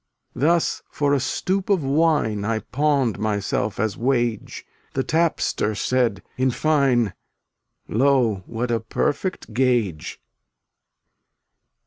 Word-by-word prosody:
fftltUt -, -, -8 dB
Thus 170 Hz, +3 st, +2 dB
for 145 Hz, -1 st, 0 dB
a 140 Hz, -, +3 dB
stoup 185 Hz, +10 st, -1 dB
of 190 Hz, -7 st, +2 dB
wine 140 Hz, -7 st, +2 dB
J 105 Hz, -, -3 dB
I 115 Hz, 0 st, +1 dB
pawned 140 Hz, -5 st, 0 dB
myself 105 Hz, -1 st, -1 dB
as 110 Hz, -1 st, -1 dB
wage; 120 Hz, -3 st, -1 dB, 0.3 s
The 135 Hz, -, 0 dB
tapster 155 Hz, -9 st, 0 dB
said, 120 Hz, -6 st, 0 dB
in 130 Hz, +1 st, +2 dB
fine: 130 Hz, -, +2 dB, 0.7 s
"Lo! 120 Hz, -5 st, +2 dB
what 120 Hz, +1 st, -3 dB
a 115 Hz, -, +1 dB
perfect 135 Hz, -, -2 dB
gage!" 115 Hz, -10 st, 0 dB
125 Hz, 115 wpm, -23 LUFS, 110-145 Hz, 0.7 s, a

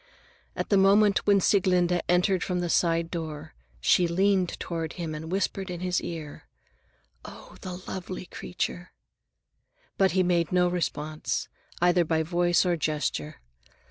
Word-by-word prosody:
At -, -, -3 dB
the 200 Hz, -, +4 dB
moment 200 Hz, +1 st, +4 dB
when 200 Hz, -1 st, +5 dB
Sieglinde 180 Hz, -2 st, +2 dB
entered 180 Hz, +1 st, +2 dB
from 180 Hz, -1 st, -1 dB
the 175 Hz, -1 st, -1 dB
side 165 Hz, -1 st, +1 dB
door, 160 Hz, -, -6 dB, 0.3 s
she 175 Hz, -, +3 dB
leaned 190 Hz, +1 st, +1 dB
toward 165 Hz, -2 st, -4 dB
him 165 Hz, -3 st, -5 dB
and 160 Hz, +2 st, -6 dB
whispered 195 Hz, 0 st, -1 dB
in 175 Hz, -1 st, -5 dB
his 180 Hz, -1 st, 0 dB
ear, 160 Hz, -4 st, -7 dB, 0.8 s
"Oh, -, -, -12 dB
the 180 Hz, -1 st, -6 dB
lovely 185 Hz, 0 st, -6 dB
creature!" 180 Hz, 0 st, -5 dB, 1.1 s
But 190 Hz, -2 st, +4 dB
he 185 Hz, 0 st, +3 dB
made 175 Hz, -2 st, +1 dB
no 180 Hz, -1 st, +3 dB
response, 155 Hz, -3 st, -2 dB, 0.3 s
either 175 Hz, 0 st, +4 dB
by 160 Hz, 0 st, 0 dB
voice 175 Hz, +2 st, +2 dB
or 175 Hz, -1 st, +2 dB
gesture. 155 Hz, -1 st, -3 dB
175 Hz, 140 wpm, -27 LUFS, 165-185 Hz, 1.1 s, when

